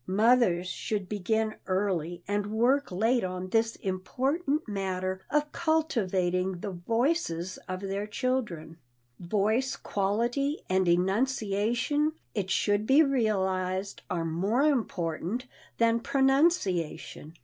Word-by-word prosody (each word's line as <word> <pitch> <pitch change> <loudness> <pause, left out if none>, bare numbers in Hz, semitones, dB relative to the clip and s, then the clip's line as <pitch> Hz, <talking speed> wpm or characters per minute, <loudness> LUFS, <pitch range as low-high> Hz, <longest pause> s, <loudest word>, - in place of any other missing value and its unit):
Mothers 205 -3 +3
should 200 +1 -3
begin 215 +2 -1
early 180 -3 -1
and 205 0 -1
work 240 +5 +2
late 225 +7 +2
on 185 0 -4
this 225 +2 +1
important 270 - -1
matter 190 -2 -2
of 300 0 +1
cultivating 190 - 0
the 205 - -4
voices 190 - -1
of 185 0 -3
their 200 +1 -3
children. 210 - -2 0.4
Voice 215 +8 0
quality 235 +9 -1
and 185 0 +2
enunciation, 225 - +1 0.2
it 200 -4 -2
should 205 +2 +1
be 280 +4 +6
realized, 190 -7 0
are 170 -2 -1
more 195 - +1
important 220 - -1 0.3
than 230 0 +3
pronunciation. 265 - +1
205 Hz, 105 wpm, -28 LUFS, 185-250 Hz, 0.4 s, be